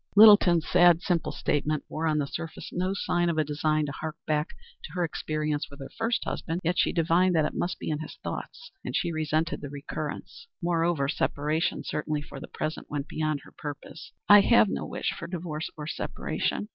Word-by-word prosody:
Littleton's 205 -6 +8
sad, 175 -1 +5
simple 175 -3 0
statement 150 +1 -1
wore 160 +1 -2
on 155 -1 +2
the 145 - +1
surface 160 +3 -6
no 185 +1 0
sign 175 -3 +1
of 165 - -1
a 155 - +4
design 155 +1 0
to 145 - -4
hark 155 +2 -5
back 150 0 0 0.4
to 150 - -11
her 180 -1 0
experience 155 -2 -2
with 140 - -13
her 135 - -8
first 230 +1 0
husband, 165 +1 -3
yet 175 +2 +1
she - - +3
divined 175 +2 +3
that 155 -2 +3
it - - -2
must 175 - -2
be - - -4
in 150 - -1
his 155 - -7
thoughts 480 - -6
and - - -4
she 170 - 0
resented 155 +1 -1
the 145 - -6
recurrence. 145 - -6
Moreover, 170 -4 +1
separation, 155 +2 0
certainly 150 -1 -2
for 140 - -9
the - - -8
present, 155 - -4
went 145 0 -3
beyond 155 -2 -1
her - - -16
purpose. 145 -1 -8 0.2
"I 205 0 +9
have 215 0 +5
no - - -3
wish - - -2
for 170 - -7
divorce 165 -3 -4
or 150 - -5
separation. 205 +6 -2
155 Hz, 200 wpm, -27 LUFS, 150-175 Hz, 0.4 s, I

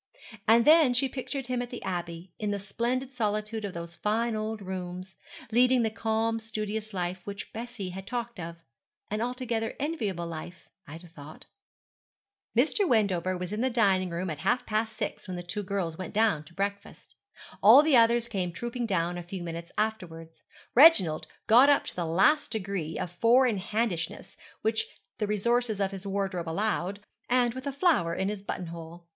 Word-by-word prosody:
And 230 +1 +6
then 305 -5 +6
she 270 +2 +3
pictured 270 +1 -5
him 250 0 -1
at 245 - -5
the 245 - -7
Abbey, 175 -1 -5
in 210 - -1
the 205 - 0
splendid 240 +6 -2
solitude 215 -1 -2
of 200 -3 -5
those 170 0 -6
fine 220 +5 0
old 215 0 -3
rooms, 185 0 -6 0.4
leading 250 +1 +4
the 220 - 0
calm, 225 +1 0
studious 215 -1 -4
life 180 -1 -3
which 200 0 -7
Bessie 230 -4 -5
had 190 +2 -8
talked 235 -3 -4
of 165 0 -6 0.6
an 210 +1 -1
altogether 240 -2 -2
enviable 220 - -2
life, 170 +2 -8 0.2
Ida 165 +4 -10
thought. 155 -2 -12 1.1
Mr. 325 - +3
Wendover 185 -5 +2
was 180 +2 -4
in 215 - -2
the 260 - +2
dining 195 -6 +2
room 170 +1 -3
at 150 - -6
half 195 +8 +1
past 220 +1 -1
six - - -4
when 185 -1 -4
the 175 - -5
two 200 +4 -4
girls 185 -4 -3
went 185 0 -6
down 215 -8 +2
to 170 - -17
breakfast. 200 +1 -4 0.5
All 290 - +9
the 310 -3 +4
others 235 0 +4
came 190 -6 -2
trooping 240 +6 -4
down 175 -3 0
a - - -7
few 180 +1 -6
minutes 170 0 -6
afterwards, 165 -7 -3 0.3
Reginald 190 - +6 0.2
got 245 +6 +7
up 285 - +4
to - - -6
the 175 -2 -2
last 195 - +3
degree 195 -7 -3
of 175 - -4
four 235 +8 +4
in 220 -6 +1
handishness 195 -4 -2 0.3
which 220 0 +1 0.3
the 210 - 0
resources 220 +1 +1
of 195 -1 0
his 195 0 -7
wardrobe 190 -4 -2
allowed, 200 +1 -1 0.3
and 245 -1 +3
with 260 +2 -6
a - - 0
flower 275 - +2
in 190 - -1
his 205 -1 -4
buttonhole. 170 -2 -7
205 Hz, 180 wpm, -28 LUFS, 180-235 Hz, 1.1 s, All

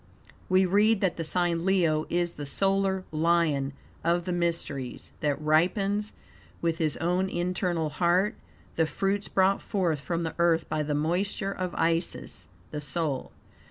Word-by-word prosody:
We 185 0 +5
read 205 +3 +4
that 190 -3 +1
the 165 - -2
sign 170 0 0
Leo 170 -5 +2
is 175 0 +1
the 145 - -7
"solar 195 +4 +1
Lion 155 -3 +2 0.3
of 170 +1 +1
the 185 - -2
mysteries, 165 -7 -2
that, 145 -2 0
ripens 195 +7 +1 0.5
with 165 0 -1
his 155 -3 +1
own 180 +3 0
internal 175 -3 -1
heat 180 - +2 0.4
the 160 -1 +3
fruits 195 +4 -1
brought 190 +1 +2
forth 175 -7 0
from 170 +3 -2
the 160 - -3
Earth 165 -1 +3
by 155 - -1
the 150 0 -1
moisture 185 +6 0
of 185 -2 -4
Isis 165 +1 -1 0.2
(the 150 - -4
soul)." 145 -1 -2
170 Hz, 150 wpm, -28 LUFS, 155-190 Hz, 0.5 s, We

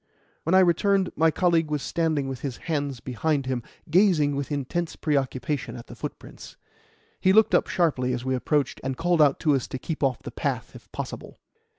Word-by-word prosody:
When 165 +4 +3
I 190 - +7
returned, 190 +2 +2
my 160 +1 +4
colleague 165 -1 +2
was 150 -2 -2
standing 155 -5 0
with 135 -2 -5
his 130 -2 -4
hands 145 -6 -3
behind 135 +4 -1
him, 130 -2 -2 0.3
gazing 165 -6 +3
with 140 +1 -3
intense 150 +4 -2
preoccupation 140 -2 -1
at 115 - -9
the - - -11
footprints. - - -9 0.6
He 185 - +4
looked 220 +1 +5
up - - +4
sharply 140 -8 +1
as 125 0 -3
we 130 - 0
approached, 140 +3 0
and 130 0 -3
called 175 -1 +2
out 145 -2 +4
to 150 - +3
us 135 -3 0
to - - -5
keep 155 +4 -5
off 135 -3 0
the - - -6
path - - -3
if - - -14
possible. - - -7
150 Hz, 195 wpm, -25 LUFS, 130-165 Hz, 0.6 s, I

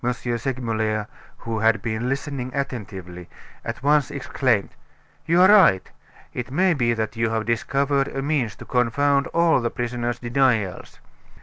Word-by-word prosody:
Segmuller, 120 -3 -2 0.3
who 115 -1 -4
had 115 +1 +3
been 115 +1 -2
listening 135 -2 -3
attentively, 95 -10 -5 0.3
at - - -6
once 145 -1 +3
exclaimed: 130 -6 0 0.6
"You 170 +2 +5
are - - +8
right. 185 - +5 0.5
It 125 0 -5
may 180 +7 +2
be 120 -5 +1
that 110 +1 -3
you 115 0 0
have 110 -1 -2
discovered 135 +4 0
a 135 - -4
means 140 -7 -1
to - - -11
confound 140 +3 +1
all 170 -5 +2
the 115 - 0
prisoner's 120 -1 -3
denials. 120 -6 0
125 Hz, 140 wpm, -23 LUFS, 115-140 Hz, 0.6 s, are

